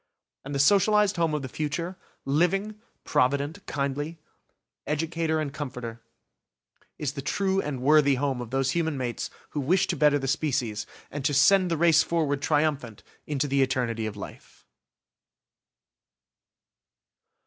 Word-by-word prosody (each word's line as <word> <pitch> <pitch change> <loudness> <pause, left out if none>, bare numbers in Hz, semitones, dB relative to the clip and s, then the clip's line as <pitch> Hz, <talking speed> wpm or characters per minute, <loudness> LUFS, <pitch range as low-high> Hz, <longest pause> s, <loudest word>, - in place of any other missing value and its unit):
And 140 +1 -5
the - - -1
socialised 205 +5 +4
home 165 -2 +1
of 150 - -3
the - - -4
future, 155 +6 -3 0.3
living, 180 +9 +1 0.3
provident, 140 +8 0
kindly; 145 +3 -3 0.7
educator 160 +1 -1
and 145 -2 -3
comforter; 125 -6 -6 1.0
is 145 -2 -3
the 140 - -5
true 195 +6 0
and 135 -4 -4
worthy 145 -1 +5
home 135 -1 -1
of 120 - -7
those 135 +1 0
human 160 -2 -1
mates 125 -2 -3 0.2
who 150 - -3
wish 170 +7 +2
to 185 - -2
better 150 -1 +4
the 135 -1 -3
species, 120 -7 -1 0.2
and 145 -1 -5
to 145 -1 +2
send 185 +6 +5
the 165 - 0
race 165 -1 +5
forward 150 -4 0
triumphant 145 -8 0 0.2
into 145 -1 -1
the 140 0 +2
eternity 120 -4 0
of 105 -1 -7
life! - - -11
145 Hz, 140 wpm, -26 LUFS, 135-165 Hz, 1.0 s, worthy